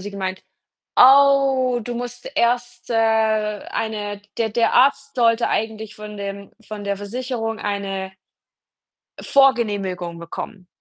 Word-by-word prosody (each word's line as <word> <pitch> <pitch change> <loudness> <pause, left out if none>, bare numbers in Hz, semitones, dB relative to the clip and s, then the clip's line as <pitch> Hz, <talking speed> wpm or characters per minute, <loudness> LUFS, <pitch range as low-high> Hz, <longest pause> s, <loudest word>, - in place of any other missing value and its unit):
sie 205 +2 -7
gemeint: 190 -1 -4 0.5
„Oh, 270 -2 +5
du 245 - -4
musst 245 0 -6
erst, 245 0 0
äh, - - 0
eine 215 -1 0 0.2
der 230 -1 +1
der 230 +2 +1
Arzt 275 +2 +3
sollte 230 -1 +3
eigentlich 220 -1 -3
von 210 0 -9
dem 200 0 -6 0.2
von 215 -1 -7
der 200 0 -1
Versicherung 225 +2 -4
eine“ 195 -2 -3 1.1
„Vorgenehmigung 205 -10 +1
bekommen.“ 180 +3 -8
220 Hz, 115 wpm, -21 LUFS, 200-245 Hz, 1.1 s, Oh